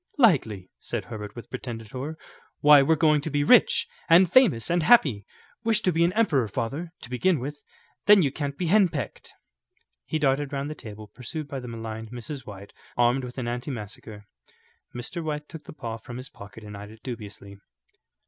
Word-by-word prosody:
"Likely," 120 - +3
said - - -4
Herbert, 105 -3 -7
with 120 - -10
pretended 115 -4 -6
horror. 140 +5 -5 0.4
"Why, 150 -1 +8
we're 160 +4 +3
going 150 -2 +3
to 160 - -4
be 145 -1 +1
rich, 235 +11 +5 0.2
and 175 +1 +6
famous 190 - +4
and 175 0 +2
happy. 140 - +4 0.4
Wish 225 -1 +2
to 185 - +2
be 165 0 +2
an 170 - +3
emperor, 155 - +2
father, 140 - -4
to 120 - -10
begin 170 +8 +2
with; 145 +3 -5 0.5
then 205 -3 +8
you 140 - +1
can't 140 0 -4
be 180 - -2
henpecked." 170 - +1 0.7
He - - -1
darted 140 -1 +1
round 140 +1 -3
the - - -3
table, 110 -6 -10
pursued 130 +7 -6
by 140 -1 -5
the 125 - -8
maligned 115 -1 -6
Mrs. 125 +3 -7
White 100 -1 -10 0.2
armed 120 +2 +3
with 125 +1 -8
an 130 - -3
antimacassar. 115 -4 -6 0.7
Mr. 145 +8 -5
White 150 -1 -4
took 160 -2 -10
the - - -9
paw 115 -6 -5
from 120 +2 -9
his 130 0 -7
pocket 105 +2 -12
and 105 -1 -9
eyed 100 +1 -9
it 110 0 -15
dubiously. 105 -5 -8
135 Hz, 185 wpm, -26 LUFS, 115-155 Hz, 0.7 s, Why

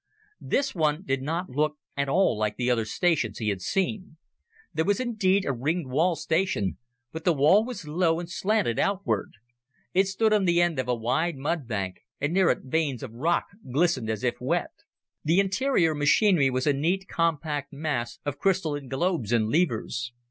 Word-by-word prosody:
This 280 - 0
one 155 0 0
did 135 -7 -1
not 165 +5 -3
look 150 +3 0 0.2
at 140 0 -1
all 185 -4 +3
like 105 0 -2
the 125 0 +1
other 115 -2 +1
stations 135 - 0
he 110 -2 -1
had 100 -2 -2
seen. 190 - -2 0.6
There 160 - +1
was 205 +6 +1
indeed 200 -6 +1
a 140 - 0
ringed 145 +3 -2
wall 165 +6 +2
station, 160 - -1 0.3
but 160 0 -7
the 175 - +3
wall 155 +10 +5
was 225 -9 -7
low 165 +1 +1
and 175 - -5
slanted 190 - 0
outward. 200 0 0 0.6
It 190 +1 +3
stood 215 +3 +2
on 205 -2 +3
the 175 -1 +3
end 175 -5 +2
of 130 - -1
a 125 - +1
wide 130 +9 0
mudbank, 125 - -3 0.2
and 145 +3 -1
near 190 -1 +4
it - - 0
veins 140 -2 -1
of 120 -4 -7
rock 160 +9 +1 0.3
glistened 140 -5 +1
as 110 -2 -3
if - - -1
wet. - - -1 0.5
The 165 +5 +3
interior 195 - +2
machinery 150 +1 +4
was 130 0 -1
a 145 - +3
neat, 180 +7 0
compact 155 -3 -1
mass 140 -5 -3
of 145 -1 -3
crystalline 160 -8 0
globes 135 - -1
and 110 -2 +2
levers. 125 -6 0
155 Hz, 180 wpm, -26 LUFS, 130-185 Hz, 0.6 s, wall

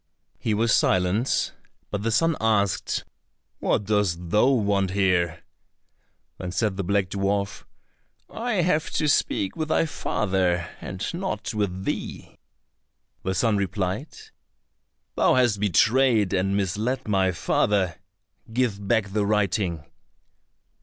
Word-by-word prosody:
He 110 - 0
was 115 +1 +2
silent, 95 +7 +2 0.4
but 100 - -2
the 115 - 0
son 165 +9 +2
asked, 100 -6 +1 0.6
"What - - +1
dost 90 -5 0
thou 105 +4 +4
want 100 -7 +2
here?" 90 -4 +1 1.0
Then 90 -1 -4
said 105 +2 0
the 100 - -2
black 100 0 +1
dwarf, 100 0 -1 0.6
"I 225 -6 -1
have 160 -3 +1
to 150 - +1
speak 100 -8 +1
with 155 -1 -2
thy 160 - +3
father, 95 - 0
and 95 +2 -5
not 185 -6 -3
with 95 -3 -2
thee." - - -5 0.8
The 95 0 -2
son 110 +2 +2
replied, 100 - -2 1.0
"Thou - - +3
hast 120 -5 +3
betrayed 110 +1 +3
and 95 +1 +1
misled 105 +7 -1
my 95 -3 +2
father, 95 0 0 0.5
give 110 -5 -1
back 100 0 +2
the 105 -1 +1
writing." 100 -6 0
100 Hz, 120 wpm, -25 LUFS, 95-115 Hz, 1.0 s, thou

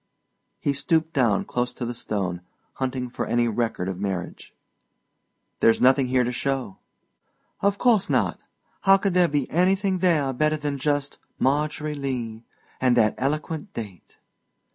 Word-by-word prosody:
He 140 - 0
stooped 160 +3 0
down 120 -8 +2
close 125 0 -2
to 120 - -4
the 120 - -3
stone, 95 -6 -3 0.3
hunting 130 -1 -3
for 120 - -4
any 120 0 +2
record 115 -5 -1
of 95 -1 -4
marriage. 95 -3 -4 1.1
"There's 115 - +4
nothing 130 +1 +4
here 125 0 +2
to 125 - -1
show." 125 -4 -3 0.8
"Of 200 0 +1
course 225 -5 +3
not. - - +1 0.4
How 195 0 +6
could 195 -1 -1
there 180 -1 +4
be 145 -4 -1
anything 190 +2 +2
there 155 -7 +2
better 155 +4 +1
than 145 -2 -3
just 145 0 -1 0.2
'Margery 150 +2 0
Lee,' 125 -6 -4 0.4
and 125 -1 +3
that 110 -2 +4
eloquent 150 +3 -3
date?" 100 -7 -8
135 Hz, 145 wpm, -24 LUFS, 120-155 Hz, 1.1 s, How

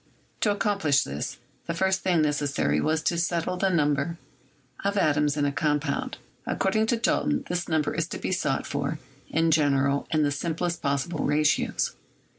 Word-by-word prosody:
To 215 - +2
accomplish 200 -9 +2
this 70 +1 -5 0.3
the 170 - -2
first 190 +1 +1
thing 175 -4 +2
necessary 140 - +1
was 160 0 0
to 170 - +1
set 170 -1 0
tle 180 - -2
the 195 +1 +2
number 150 -1 +1 0.7
of 200 +1 0
atoms 150 -4 +2
in 145 - +2
a 140 - +1
compound. 150 0 -1 0.3
According 215 +3 +1
to 235 - +2
Dalton, 280 +4 +1
this 175 -1 -2
number 155 -2 +1
is - - -1
to - - -5
be - - -3
sought - - 0
for, - - -2 0.3
in 165 0 +2
general, 140 -2 +2
in 155 -2 +2
the 145 - +2
simplest 170 +3 -2
possible 140 +3 -1
ratios. 150 +1 +1
160 Hz, 170 wpm, -26 LUFS, 145-180 Hz, 0.7 s, To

